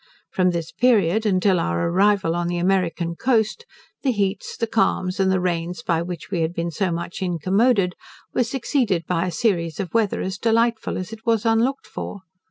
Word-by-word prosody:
From 185 -1 +2
this 170 -2 -3
period, 220 -1 +3
until 185 -1 +3
our 85 - 0
arrival 190 -1 +2
on 175 0 -1
the 175 0 -1
American 175 -2 0
coast, 245 - 0 0.3
the 270 - +2
heats, 200 -3 -2
the 230 - 0
calms, 195 -4 0
and 190 -1 +3
the 190 - +2
rains 175 0 -2
by 165 -2 +1
which 175 0 -6
we 175 -4 0
had 165 +2 -1
been 170 0 -2
so 185 +3 -1
much 170 +2 -4
incommoded, 190 - +2 0.4
were - - +2
succeeded 235 - 0
by 180 0 0
a - - -2
series 170 -4 0
of 185 -5 -4
weather 220 -3 +1
as 185 0 -4
delightful 230 0 +1
as 185 +4 -5
it 225 0 -10
was 225 -1 +2
unlooked 230 +4 +1
for. 200 - -7
190 Hz, 185 wpm, -22 LUFS, 170-220 Hz, 0.4 s, period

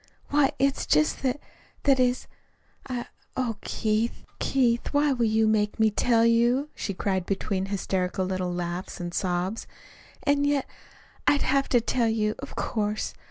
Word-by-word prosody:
"Why, 285 -1 +3
it's 275 0 +1
just 150 0 +2
that 265 +1 0 0.4
that 275 -2 +4
is 250 0 +2 0.6
I 245 -2 -3 0.3
oh, 240 -4 -1
Keith, 220 +2 -1
Keith, 245 -3 +1
why 290 0 +3
will 240 -3 +1
you 220 0 +3
make 210 0 +1
me 220 -1 +4
tell 230 +2 +3
you?" 240 +5 +3
she 200 - -4
cried 190 -2 -1
between 195 -1 -1
hysterical 190 -1 -1
little 185 -1 -2
laughs 175 +1 -4
and 175 -1 -5
sobs. 185 +3 -1 0.6
"And 285 0 +2
yet 285 -2 +1 0.6
I'd 290 - +4
have 275 0 +1
to 245 - +4
tell 235 0 +1
you, 215 -1 +1
of 280 - -8
course. 215 -2 -2
225 Hz, 155 wpm, -26 LUFS, 195-260 Hz, 0.6 s, that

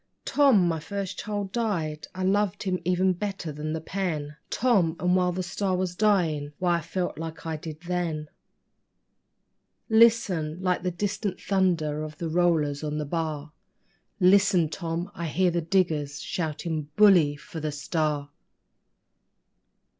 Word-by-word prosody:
Tom, 265 -11 +4
my 165 -1 0
first 195 +3 -5
child 205 -2 -3
died. 170 -10 -2
I 185 - -3
loved 200 0 +1
her 185 -2 -1
even 185 +1 +2
better 195 -3 -4
than 150 +1 -4
the 160 - -2
pen 160 -4 -3
Tom 200 -10 +2
and 180 0 +2
while 180 -1 +2
the 185 +1 -3
STAR 185 +1 -1
was 180 -1 -2
dying, 165 -8 +1
why, 175 -1 +2
I - - -8
felt 175 +1 -3
like 165 0 -6
I 160 -1 -2
did 155 0 -8
THEN...... 170 -4 -2 1.6
Listen! 220 -9 +4
Like 185 -1 0
the 180 - -1
distant 200 +2 -3
thunder 170 -6 +1
of 155 -1 -6
the 165 0 -3
rollers 160 -4 +1
on 150 0 -2
the 150 - -2
bar 155 -1 -3 0.7
Listen, 185 -3 +4
Tom! 170 +3 -4
I 170 0 -4
hear 180 +4 +2
the 170 0 0
diggers 155 -5 0
shouting: 155 -2 -3
'Bully 180 -8 +6
for 160 +3 -9
the 155 0 -2
STAR!'' 145 -1 -2
175 Hz, 145 wpm, -26 LUFS, 155-190 Hz, 1.6 s, Bully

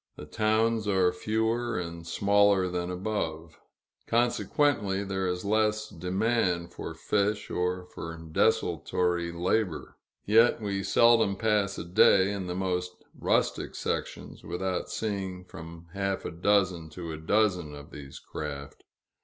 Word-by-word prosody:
The - - -9
towns 110 +4 +1
are 95 -3 +3
fewer 110 +4 -1
and 85 -1 -6
smaller 100 -1 +3
than 90 0 -3
above; 90 -4 -4 0.5
consequently 120 -3 +1
there 95 -1 -2
is 90 +1 -2
less 110 +1 +1
demand 90 -1 0
for 80 - -6
fish, 105 +4 -1
or 90 0 -1
for 85 -2 -7
desultory 85 +2 0
labor. 90 +1 -1 0.3
Yet 115 +4 +5
we 100 -3 -2
seldom 110 0 +4
pass 105 -1 +1
a - - -5
day, 95 +1 +5
in 100 -3 -4
the 90 - -3
most 90 -1 -1 0.2
rustic - - 0
sections, - - -4
without 90 +2 -3
seeing 95 -4 -3
from 85 -1 -10
half 100 -1 -2
a - - -3
dozen 90 -2 +1
to 85 -2 -5
a 80 - -5
dozen 90 -2 +1
of 70 0 -11
these 70 -2 -9
craft. 70 -2 -7
95 Hz, 130 wpm, -28 LUFS, 85-105 Hz, 0.5 s, Yet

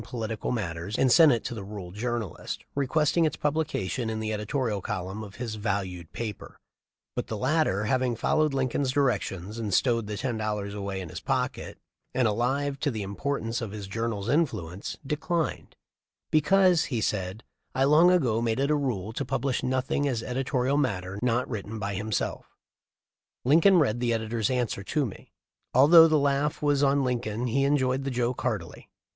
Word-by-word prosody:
political 115 -1 -4
matters 100 -3 -3
and 130 - +3
sent 160 0 +8
it 120 - 0
to 125 - -4
the 110 -4 -6
rural 95 -3 -8
journalist, 115 -1 -4
requesting 150 +4 +2
its 155 - +1
publication 145 -7 -1
in 110 0 -3
the 110 0 -2
editorial 105 0 -1
columns 95 +1 -4
of 100 -1 -10
his 120 -3 -4
"valued 95 -5 -3
paper," 110 -4 -6 0.6
but - - -3
the 110 - -4
latter, 130 -5 +1
having 125 +1 +1
followed 155 +6 +2
Lincoln's 135 0 0
directions 110 -7 -1
and 110 -3 -3
stowed 115 +2 +2
the 105 -1 -4
ten 120 -1 -2
dollars 105 -2 -2
away 100 -2 -4
in 90 - -7
his - - -6
pocket, - - -2 0.4
and 125 -2 +3
alive 135 +6 0
to 145 - 0
the 110 -6 -3
importance 115 +3 -3
of 115 - -3
his 105 -2 -6
journal's 110 0 -3
influence, 110 - -1
declined, 160 +3 -2 0.6
"because," 175 +2 +4
he 120 -5 -2
said, 95 0 -2 0.3
"I 135 - +2
long 155 +5 +6
ago 130 -11 +2
made 115 +1 0
it 140 +2 +1
a - - +4
rule 115 -8 -2
to - - -2
publish 135 0 -1
nothing 130 +2 0
as 120 -4 -1
edito 130 0 -1
rial 135 +3 +2
matter 100 -8 -1
not 125 0 +1
written 110 -1 -5
by 100 -1 -3
himself." 105 +2 -2 1.0
Lincoln 165 +8 +6
read 120 -8 +2
the 120 -1 +1
editor's 110 -1 -1
answer 125 -6 -1
to 145 +7 0
me. 105 - -9 0.4
Although 160 +5 +9
the 155 -1 +3
laugh 140 +1 +1
was 145 -1 +2
on 140 0 +3
Lincoln 120 -2 -2
he 135 +3 +1
enjoyed 135 -2 +1
the 135 - -2
joke 125 -1 -1
heartily. 105 -10 -4
120 Hz, 175 wpm, -27 LUFS, 105-140 Hz, 1.0 s, Although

